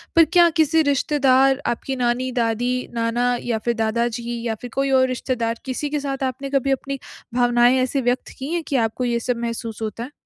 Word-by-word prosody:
पर 330 -1 +7
क्या 345 -1 +7
किसी 320 +1 +4
रिश्तेदार 270 -2 +3
आपकी 240 +3 -2
नानी, 250 +1 0
दादी, 245 +1 -1
नाना 240 +2 +1
या 235 -2 -1
फिर 235 - +2
दादाजी 235 +1 -1
या 220 - -1
फिर 245 - -7
कोई 275 0 0
और 260 -1 +4
रिश्तेदार, 240 -2 -2
किसी 265 +3 -3
के 295 0 -1
साथ 275 -1 -3
आपने 265 +1 -3
कभी 275 -1 +1
अपनी 275 0 -2 0.3
भावनाएँ 245 +1 +4
ऐसी 265 +2 -1
व्यक्त 245 0 -1
की 275 +5 -4
हैं 345 -1 -1
कि 280 - -2
आपको 235 +1 0
ये 235 -1 0
सब 240 +1 -2
महसूस 230 -1 -4
होता 220 +1 -4
है? 260 - -8
250 Hz, 200 wpm, -22 LUFS, 235-275 Hz, 0.3 s, पर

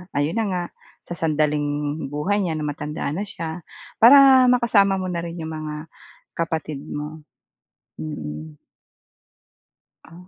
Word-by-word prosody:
ayun 145 +9 0
na 225 - +1
nga, 180 -2 -1 0.4
sa - - -7
sandaling 150 -1 -1
buhay 150 +9 -1
niya 175 -5 -1
na 155 - -3
matanda 150 0 -3
na 195 +7 -3
siya. 165 -2 -6 0.3
Para 265 +1 +8
makasama 225 -6 +4
mo 185 -1 -3
na 170 - -2
rin 170 0 -6
'yong 160 - -5
mga 155 -1 -5 0.6
kapatid 160 -3 -2
mo. 150 +2 -6 0.8
Mm. 75 0 -6 1.5
Oh, 175 +3 -15
160 Hz, 130 wpm, -22 LUFS, 150-190 Hz, 1.5 s, Para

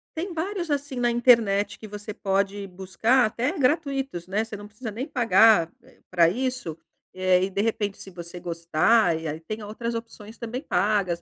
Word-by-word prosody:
tem 340 +3 -4
vários, 345 -1 -3
assim, 285 -2 -2
na 240 -1 +1
internet 220 -4 +3
que 215 - -10
você 210 +1 -7
pode 200 0 -1
buscar, 190 +7 +1
até 235 +6 -1
gratuitos, 270 - 0
né. 210 +4 0
Você 220 - -8
não 205 - -9
precisa 215 +3 -8
nem 230 +6 -4
pagar, 225 - +4
eh, - - -22
pra 170 -2 +4
isso, 250 -7 -3 0.4
eh, 185 0 +3
e, 195 - 0
de 200 +1 -1
repente, 210 -2 -1
se 195 - -9
você 175 0 -9
gostar, 170 +2 +2
e 160 - -5
aí 155 +2 -5
tem 215 +6 -6
outras 230 +3 -4
opções 230 -1 -8
também 240 +3 -5
pagas, 200 - 0
215 Hz, 180 wpm, -25 LUFS, 185-245 Hz, 0.4 s, pagar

